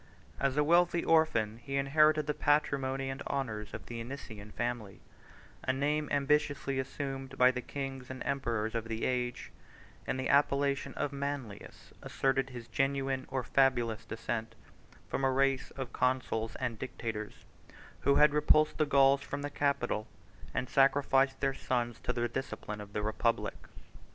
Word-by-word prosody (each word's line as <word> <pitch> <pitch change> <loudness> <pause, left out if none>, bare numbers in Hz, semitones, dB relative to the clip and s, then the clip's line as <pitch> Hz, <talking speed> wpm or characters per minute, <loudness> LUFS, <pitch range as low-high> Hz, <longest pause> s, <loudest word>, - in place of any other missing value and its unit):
As 140 0 0
a 150 - +5
wealthy 170 +2 +4
orphan, 115 -10 +3
he 135 +2 -5
inherited 155 +2 +4
the 150 - 0
patrimony 135 -3 +1
and 135 - -6
honors 110 -6 -3
of - - -8
the 115 -1 -5
Anician 110 -5 -8
family, 115 -5 -3 0.6
a - - +1
name 145 +3 0
ambitiously 145 -1 +1
assumed 135 0 -5
by 125 0 +6
the 125 -1 -4
kings 135 -1 -6
and 130 -1 -6
emperors 115 -5 -1
of 115 -1 -2
the 115 0 -2
age; 125 -1 -2 0.6
and 130 - -1
the 130 - -1
appellation 140 0 +2
of 145 - -2
Manlius 140 -7 -6
asserted 135 0 0
his 120 -2 -8
genuine 135 -1 0
or 130 -1 -1
fabulous 120 -4 +2
descent 115 0 -4 0.5
from 135 - -2
a 135 - +4
race 135 0 +1
of 130 -3 -5
consuls 125 -3 0
and 120 -4 -3
dictators, 110 -5 -5 0.5
who 140 +1 +3
had 150 -1 +6
repulsed 155 +1 +3
the 155 - +3
Gauls 140 0 +5
from 140 0 -5
the 145 - -3
Capitol, 140 -7 0 0.4
and 125 - -2
sacrificed 135 0 +3
their 135 -1 +1
sons 120 -3 -2
to - - -2
the 120 -1 0
discipline 110 -4 -5
of 105 0 -11
the 105 - -2
republic. 110 +2 -1
135 Hz, 155 wpm, -32 LUFS, 120-140 Hz, 0.6 s, by